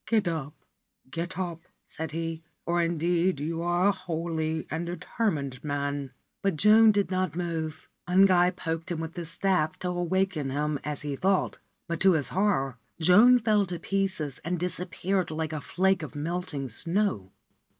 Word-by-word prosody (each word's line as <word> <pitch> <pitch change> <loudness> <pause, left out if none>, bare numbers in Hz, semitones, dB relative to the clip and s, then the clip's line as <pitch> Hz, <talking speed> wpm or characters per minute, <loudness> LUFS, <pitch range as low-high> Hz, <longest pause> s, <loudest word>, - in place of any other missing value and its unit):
' - - -53
Get 220 -4 +2
up, 155 -4 -3 0.6
get 170 +5 -4
up/ 175 -3 -3 0.2
said 160 -2 -5
he, 165 0 -3
' - - -49
for 175 0 +1
indeed 170 0 +1
you 165 +3 -2
are 175 +3 +3
a - - +5
holy 165 -4 -3
and 165 +2 -2
determined 155 - -2
man/ 140 -2 -2 0.3
But 195 -3 +1
Joan 215 +5 +7
did 200 -2 0
not 185 -4 0
move. 160 -3 -3 0.2
Ungai 180 -1 +5
poked 165 -2 -4
him 170 -2 -2
with 165 0 -5
his 170 -3 -5
staff, 180 -3 +1
to 180 - -3
awaken 175 -4 0
him, 145 +1 -1
as 150 0 -3
he 145 -2 -2
thought; 190 +6 +1 0.3
but, 170 -1 -2
to 190 0 +5
his 150 -4 0
horror, 155 - 0 0.2
Joan 210 +10 +7
fell 215 -4 +2
to 175 -1 -4
pieces, 190 -6 -2
and 175 +2 -2
disappeared 180 +1 -1
like 160 0 -3
a 155 - -3
flake 190 +3 +1
of 150 -4 -7
melting 150 -3 -3
snow. 165 - -1
170 Hz, 170 wpm, -28 LUFS, 155-185 Hz, 0.6 s, Joan